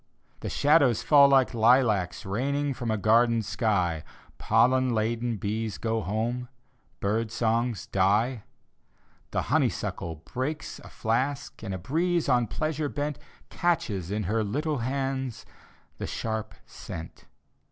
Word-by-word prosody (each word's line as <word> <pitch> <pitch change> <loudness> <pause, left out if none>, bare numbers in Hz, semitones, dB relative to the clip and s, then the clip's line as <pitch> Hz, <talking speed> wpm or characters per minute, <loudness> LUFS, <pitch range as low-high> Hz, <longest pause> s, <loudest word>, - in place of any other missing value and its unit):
The - - -4
shadows 145 -5 +3
fall 140 -2 +7
like 135 -2 +4
lilacs 110 -6 +3
Raining 140 +8 -1
from 120 -2 -4
a 110 - +1
garden 115 +2 +3
sky. 100 -7 0 0.4
Pollen 125 +2 +3
laden 115 +1 -1
bees 105 +2 -3
go 115 -1 -1
home, 115 +6 -2 0.5
Bird 110 +3 0
songs 115 -1 0
die. 105 +6 +1 0.9
The - - -1
honeysuckle 85 -1 0
breaks 145 +5 -4
a - - -12
flask. 130 +5 -2
And 110 -4 -5
a 95 - -2
breeze, 165 - 0
on 125 -3 +3
pleasure 155 +3 -2
bent, 145 0 -3 0.3
Catches 105 - 0
in 105 +1 -1
her 110 +2 0
little 145 +7 -1
hands 135 0 -2 0.5
The - - -3
sharp 110 -1 -4
scent. 80 -1 -9
115 Hz, 125 wpm, -27 LUFS, 110-135 Hz, 0.9 s, fall